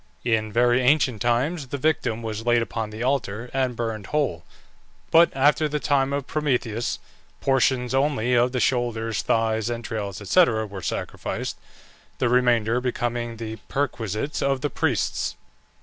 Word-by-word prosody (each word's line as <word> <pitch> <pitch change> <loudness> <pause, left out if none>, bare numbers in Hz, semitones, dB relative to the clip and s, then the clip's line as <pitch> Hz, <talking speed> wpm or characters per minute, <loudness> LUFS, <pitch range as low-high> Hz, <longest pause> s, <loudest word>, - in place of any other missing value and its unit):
In 110 -2 +1
very 120 +2 +3
ancient 130 -4 +3
times, 135 +6 0
the 140 - -4
victim 125 -6 0
was 110 -1 -4
laid 120 0 +3
upon 110 -1 -4
the 110 +2 -5
altar 120 -3 -1
and 130 -2 0
burned 115 -3 -3
whole; 135 - -1 0.7
but 170 +1 +7
after 150 +3 +3
the 150 0 -1
time 140 -2 +1
of 140 -1 -2
Prometheus 125 -6 -1 0.4
portions 130 -2 +2
only 135 -3 +1
of 120 +1 +3
the 125 - -1
shoulders, 115 -3 0
thighs, 110 0 +1
entrails, 105 -4 -4
&c., 180 - +6
were 110 - -2
sacrificed, - - -4 0.6
the 120 - +1
remainder 120 -1 +3
becoming 120 -2 -2
the 110 0 -5
perquisites 125 -1 -2
of 135 -1 +1
the 145 - -1
priests. - - -1
120 Hz, 145 wpm, -24 LUFS, 110-135 Hz, 0.7 s, but